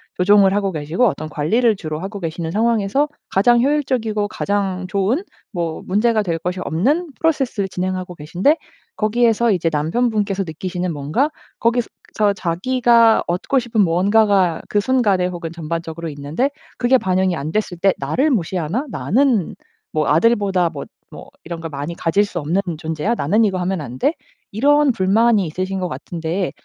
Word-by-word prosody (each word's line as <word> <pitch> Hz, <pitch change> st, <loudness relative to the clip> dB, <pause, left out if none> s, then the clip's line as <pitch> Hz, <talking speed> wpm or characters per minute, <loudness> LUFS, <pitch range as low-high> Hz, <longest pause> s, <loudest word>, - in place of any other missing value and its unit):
조종을 195 Hz, +1 st, +4 dB
하고 200 Hz, -2 st, 0 dB
계시고 160 Hz, +10 st, 0 dB
어떤 155 Hz, -4 st, -3 dB
관리를 215 Hz, +11 st, +2 dB
주로 155 Hz, -5 st, -5 dB
하고 200 Hz, +3 st, -6 dB
계시는 165 Hz, -1 st, -4 dB
상황에서 225 Hz, -, +1 dB, 0.2 s
가장 235 Hz, +5 st, +4 dB
효율적이고 250 Hz, -7 st, 0 dB
가장 195 Hz, -3 st, -2 dB
좋은 200 Hz, -, 0 dB, 0.3 s
뭐 170 Hz, -5 st, -3 dB
문제가 215 Hz, +3 st, +2 dB
될 170 Hz, -4 st, -2 dB
것이 180 Hz, +2 st, -3 dB
없는 290 Hz, -, 0 dB
프로세스를 270 Hz, -11 st, 0 dB
진행하고 185 Hz, -1 st, -3 dB
계신데. 180 Hz, -, +1 dB, 0.4 s
거기에서 230 Hz, +1 st, +2 dB
이제 170 Hz, -4 st, +1 dB
남편분께서 200 Hz, +5 st, 0 dB
느끼시는 180 Hz, +2 st, -4 dB
뭔가 155 Hz, -, 0 dB, 0.3 s
거기서 235 Hz, +1 st, +1 dB, 0.5 s
자기가 230 Hz, +6 st, +3 dB
얻고 180 Hz, +10 st, 0 dB
싶은 235 Hz, -3 st, 0 dB
무언가가 190 Hz, 0 st, +3 dB
그 205 Hz, -, +2 dB
순간에 205 Hz, -6 st, +2 dB
혹은 170 Hz, -2 st, -6 dB
전반적으로 165 Hz, 0 st, -5 dB
있는데 150 Hz, -, -2 dB, 0.3 s
그게 250 Hz, +2 st, +4 dB
반영이 185 Hz, -4 st, +1 dB
안 155 Hz, 0 st, -4 dB
됐을 205 Hz, -4 st, -2 dB
때 195 Hz, +2 st, +3 dB
'나를 255 Hz, -, +1 dB
무시하나? 185 Hz, -, -1 dB
나는 210 Hz, -, +1 dB, 0.4 s
뭐 155 Hz, -1 st, 0 dB
아들보다 190 Hz, 0 st, +2 dB
뭐 145 Hz, -, -7 dB, 0.2 s
뭐 -, -, -11 dB, 0.2 s
이런 165 Hz, 0 st, -6 dB
걸 165 Hz, -, -5 dB
많이 145 Hz, +3 st, -5 dB
가질 185 Hz, +6 st, +1 dB
수 195 Hz, -3 st, -7 dB
없는 165 Hz, +6 st, 0 dB, 0.2 s
존재야? 160 Hz, +6 st, -2 dB
나는 210 Hz, +9 st, +2 dB
이거 190 Hz, -3 st, 0 dB
하면 185 Hz, +1 st, -1 dB
안 125 Hz, -4 st, -7 dB
돼?' 290 Hz, -, +1 dB, 0.4 s
이런 285 Hz, +6 st, +3 dB
불만이 215 Hz, 0 st, +3 dB
있으신 185 Hz, +4 st, -3 dB
것 180 Hz, -, -1 dB
같은데. 175 Hz, +2 st, -3 dB
190 Hz, 355 characters per minute, -19 LUFS, 165-230 Hz, 0.5 s, 조종을